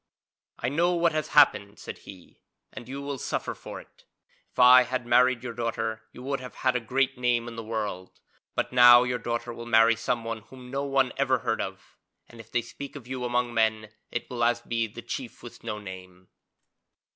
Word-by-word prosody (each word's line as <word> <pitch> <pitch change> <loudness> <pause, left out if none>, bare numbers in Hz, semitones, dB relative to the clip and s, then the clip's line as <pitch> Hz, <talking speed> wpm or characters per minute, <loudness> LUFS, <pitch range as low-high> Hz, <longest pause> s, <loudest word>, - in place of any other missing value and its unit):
'I 120 - -2
know 170 +5 +2
what 170 -1 +3
has 155 -1 -2
happened,' 105 -8 +4
said - - -8
he. 95 -3 -14 0.3
'And 120 - -9
you 140 +1 -6
will 140 -2 -4
suffer - - -3
for - - -9
it. - - -19 0.5
If - - -32
I 125 0 +9
had 125 -1 -2
married 125 0 +3
your 120 -2 -5
daughter, 115 -1 -3
you 125 - -11
would 140 +1 -2
have 125 0 -10
had 130 - +3
a - - +2
great 130 +2 0
name 120 -1 +1
in 115 - -7
the 115 - -6
world, 105 -4 -5 0.4
but - - -1
now 120 -1 +9
your 125 0 -2
daughter 120 +1 -3
will 115 0 -9
marry 115 0 +5
someone 115 0 -2
whom 125 +3 -13
no 140 +1 -2
one 135 -2 +1
ever 135 -1 +2
heard 110 - 0
of, 95 0 -8 0.3
and 120 - -15
if 115 0 -13
they 120 - 0
speak 140 +5 -9
of 140 -5 -9
you 130 -1 -4
among 120 0 0
men 110 -1 +1 0.2
it 120 - -4
will 125 - -7 0.3
be 115 -1 0
as 105 - -21
The 120 - -8
Chief 120 0 -6
with 120 - -11
no 110 -2 -4
name.' 95 -2 -11
120 Hz, 205 wpm, -27 LUFS, 115-130 Hz, 0.5 s, I